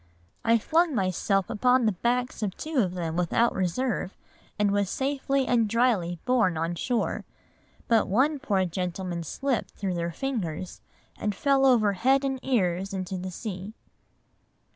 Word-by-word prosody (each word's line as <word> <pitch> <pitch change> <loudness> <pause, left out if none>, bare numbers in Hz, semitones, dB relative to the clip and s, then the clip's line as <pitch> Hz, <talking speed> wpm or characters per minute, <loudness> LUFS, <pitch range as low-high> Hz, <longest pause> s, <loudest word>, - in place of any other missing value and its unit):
I 230 0 +4
flung 320 +6 +2
myself 195 -1 +1
upon 250 +2 +3
the 215 - +4
backs 240 +6 -1
of 200 -3 -2
two 315 -1 -4
of 185 -5 +1
them 165 -2 -3
without 180 +7 +2
reserve, 195 +2 -1 0.4
and 205 -1 +2
was 200 -1 +1
safely 275 +1 0
and 230 -4 +2
dryly 215 -7 +1
borne 230 -10 +2
on 165 +2 -1
shore, 240 +7 -1 0.6
but 225 -2 +3
one 275 +9 +2
poor 195 -6 +1
gentleman 180 0 -3
slipped 260 - -2
through 195 -3 -2
their 170 0 -2
fingers, 185 - -4 0.4
and 210 -2 -1
fell 275 +3 +3
over 220 -6 +4
head 265 +7 +2
and 265 -1 -1
ears 195 -6 0
into 190 0 -4
the 185 +1 -5
sea." 190 +2 -6
210 Hz, 150 wpm, -27 LUFS, 185-255 Hz, 0.6 s, I